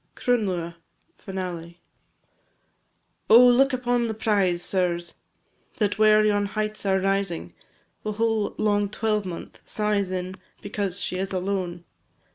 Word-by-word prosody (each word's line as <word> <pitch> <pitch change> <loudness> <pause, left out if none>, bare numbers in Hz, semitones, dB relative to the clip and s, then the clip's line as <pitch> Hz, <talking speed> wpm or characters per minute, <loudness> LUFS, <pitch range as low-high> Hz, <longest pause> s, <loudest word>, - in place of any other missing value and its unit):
CRUNLUATH 185 -9 -1 0.4
(FINALE). 180 -3 -6 1.5
Oh, 235 +3 +9
look 255 +3 +5
upon 245 -2 0
the 220 - -3
prize, 195 -5 +1
sirs, 175 -3 -1 0.6
That 210 -1 0
where 215 0 +6
yon 205 -1 +2
heights 215 0 -3
are 190 0 +3
rising, 195 - -1 0.5
The 215 - -3
whole 220 -1 0
long 205 -1 +1
twelvemonth 210 -4 -3
sighs 210 -2 -1
in, 185 0 -4 0.2
Because 200 -2 -3
she 185 - -3
is 190 0 -2
alone. 185 -2 -2
200 Hz, 115 wpm, -25 LUFS, 185-215 Hz, 1.5 s, Oh